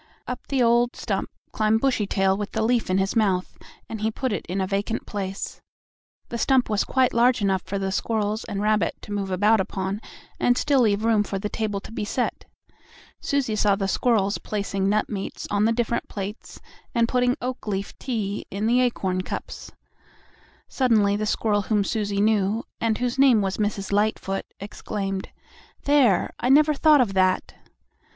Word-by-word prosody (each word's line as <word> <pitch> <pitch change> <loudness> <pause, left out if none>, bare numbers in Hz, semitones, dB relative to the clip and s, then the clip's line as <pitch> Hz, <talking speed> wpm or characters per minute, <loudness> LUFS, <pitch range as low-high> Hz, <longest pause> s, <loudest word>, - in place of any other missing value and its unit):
Up 250 0 -6
the 270 -3 +1
old 235 +1 +3
stump - - -3 0.2
climbed 215 0 +2
Bushytail 200 -7 +1
with 205 0 -5
the 220 - 0
leaf 235 -1 +1
in 185 - +2
his 195 +3 0
mouth, 195 -5 +1 0.3
and 220 -2 -6
he 220 - +1
put 250 +1 -2
it - - -3
in 185 +3 -2
a 190 - +1
vacant 200 +4 -2
place. 195 -1 -5 0.7
The 235 - -4
stump 260 -2 +2
was 210 - +2
quite 260 -2 +1
large 240 +1 +4
enough 195 -2 +1
for 200 - -4
the 195 0 -2
squirrels 215 +1 -1
and 200 0 -3
rabbit 215 0 +1
to - - -10
move 200 -1 -2
about 210 +4 +3
upon 190 +2 -3 0.4
and 245 0 +3
still 280 -3 +3
leave 215 -1 +2
room 225 -2 +4
for 200 - -4
the 205 +2 -3
table 210 -2 -2
to - - -11
be 225 - -4
set. 240 +4 -2 0.7
Susie 275 -6 -1
saw 205 -1 +3
the 195 -1 -2
squirrels 205 -1 +1
placing 200 -2 -2
nut 210 +1 +1
meats 195 -3 -5
on 205 +1 +2
the 225 - +3
different 235 0 -1
plates 205 +2 -7 0.4
and 230 -1 +3
putting 250 0 +1
oak 250 -2 -5
leaf 195 -1 -3
tea 210 -6 -3
into 205 +3 -1
the 250 +1 +4
acorn 190 -7 0
cups. - - -7 1.0
Suddenly 220 -6 +2
the 215 +1 -2
squirrel 210 -1 +1
whom 205 0 +1
Susie 205 -1 -1
knew 215 +1 +2 0.2
and 225 -1 +1
whose 250 +1 -2
name 265 -5 +6
was 195 -1 -2
Mrs. 205 -2 -2
Lightfoot, 200 -1 0
exclaimed: 195 -1 -4 0.5
"There! 275 -9 +3
I 245 - 0
never 300 +3 +5
thought 300 -1 +5
of 210 -6 0
that!" 185 -1 +1
215 Hz, 180 wpm, -24 LUFS, 200-235 Hz, 1.0 s, name